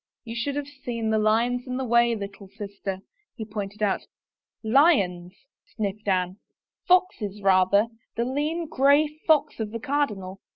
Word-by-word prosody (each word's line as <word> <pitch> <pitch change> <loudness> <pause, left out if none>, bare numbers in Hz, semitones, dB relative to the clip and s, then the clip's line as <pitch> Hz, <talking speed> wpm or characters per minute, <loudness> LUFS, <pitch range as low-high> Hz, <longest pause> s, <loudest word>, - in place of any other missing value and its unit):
" - - -68
You 230 0 -6
should 275 +4 -2
have 290 -1 -3
seen 240 -5 -4
the 220 - +2
lions 235 +4 +1
in 255 0 -3
the 265 - -2
way, 235 0 +3
little 200 -1 -8
sister," 200 -1 -6 0.3
he 220 - -6
pointed 205 0 -5
out. 200 -2 0 0.3
" - - -64 0.2
Lions! 185 - +2 0.2
" - - -33
sniffed 210 -1 -3
Anne. 185 -1 0 0.2
" - - -55
Foxes 355 - +2
rather 195 +2 +4 0.2
— - - -46
the 235 - +1
lean, 300 +6 -1
gray 285 +1 +4 0.2
fox 310 -6 +3
of 220 -1 -2
the 230 +2 -5
cardinal. 215 -9 -2
220 Hz, 175 wpm, -25 LUFS, 200-265 Hz, 0.3 s, rather